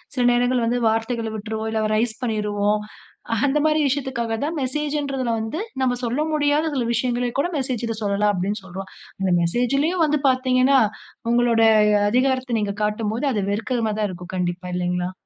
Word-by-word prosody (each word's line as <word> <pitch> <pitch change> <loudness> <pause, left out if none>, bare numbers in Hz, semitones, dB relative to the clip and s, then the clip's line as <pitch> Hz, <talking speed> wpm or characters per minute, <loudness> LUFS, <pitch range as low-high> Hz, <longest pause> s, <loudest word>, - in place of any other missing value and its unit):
சில 250 -2 +1
நேரங்கள் 245 0 +2
வந்து, 240 +2 +1
வார்த்தைகள 225 0 -1
விட்ருவோம். 220 +1 -4
இல்ல 220 -1 0
ரைஸ் 220 0 0
பண்ணிருவோம். 210 -2 0 0.6
அந்த 285 +1 +2
மாரி, 310 0 +3
விஷயத்துக்காக 260 -4 -1
தான், 325 +3 -3
மெசேஜ்ன்றதுல 275 -2 -1
வந்து, 220 +9 -3 0.2
நம்ம 250 -1 +2
சொல்ல 245 +5 -1
முடியாத, 295 0 +2
சில 250 -3 0
விஷயங்கள 245 +1 0
கூட 340 - +1
மெசேஜ்ல 245 -4 -2
சொல்லலாம். 205 +1 +2
அப்படினு 200 +4 -2
சொல்றோம். 190 +1 -8 0.3
அந்த 190 -1 +1
மெசேஜ்லயும் 275 - +1
வந்து 300 0 +1
பாத்தீங்கனா, 255 +1 +3 0.5
உங்களோட 240 -1 +3 0.5
அதிகாரத்த 255 0 +1
நீங்க 200 -1 -1
காட்டும்போது, 215 +4 -1
அது 210 - 0
வெறுக்கறமாதான் 215 -1 -1
இருக்கும். 180 +1 -9
கண்டிப்பா, 180 0 -2
இல்லைங்களா? 180 0 -1
235 Hz, 145 wpm, -22 LUFS, 210-260 Hz, 0.6 s, மாரி